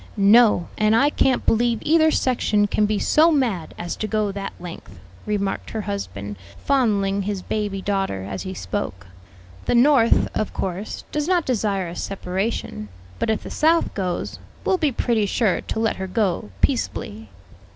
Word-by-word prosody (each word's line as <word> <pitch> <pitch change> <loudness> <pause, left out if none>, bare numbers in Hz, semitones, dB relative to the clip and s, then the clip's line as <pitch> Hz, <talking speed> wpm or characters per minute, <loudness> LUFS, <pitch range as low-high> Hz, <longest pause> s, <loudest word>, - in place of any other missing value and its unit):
"No; 210 -3 +5
and 215 +1 +4
I 280 +5 +4
can't 265 -3 +1
believe 235 +1 +2
either 315 +1 +4
section 230 -7 +2
can 210 +1 +1
be 210 0 0
so 315 +9 +4
mad 235 - 0
as 175 0 -4
to 215 - -2
go 215 -1 0
that 195 0 -5
length," 175 - -9 0.3
remarked 200 -2 -2
her 220 - -3
husband, 105 - -5 0.3
fondling 205 -8 +2
his 195 -1 -3
baby 205 -3 -3
daughter 195 - -1
as 95 0 -5
he 190 0 -6
spoke. 95 - -4 0.6
"The - - +1
North, 245 -2 +5
of 215 - -2
course, 190 +2 -4
does 300 0 -1
not 355 -3 +2
desire 205 -6 0
a 170 - -7
separation; 190 - -3 0.3
but - - -1
if 220 - 0
the - - -8
South 325 +2 +2
goes, 185 -3 -3 0.3
will 375 - +2
be 300 -3 +2
pretty 230 -3 +1
sure 205 -1 +1
to - - -4
let 225 -1 0
her 190 - -4
go 185 - -1
peaceably." 105 +5 -1
210 Hz, 165 wpm, -22 LUFS, 190-235 Hz, 0.6 s, No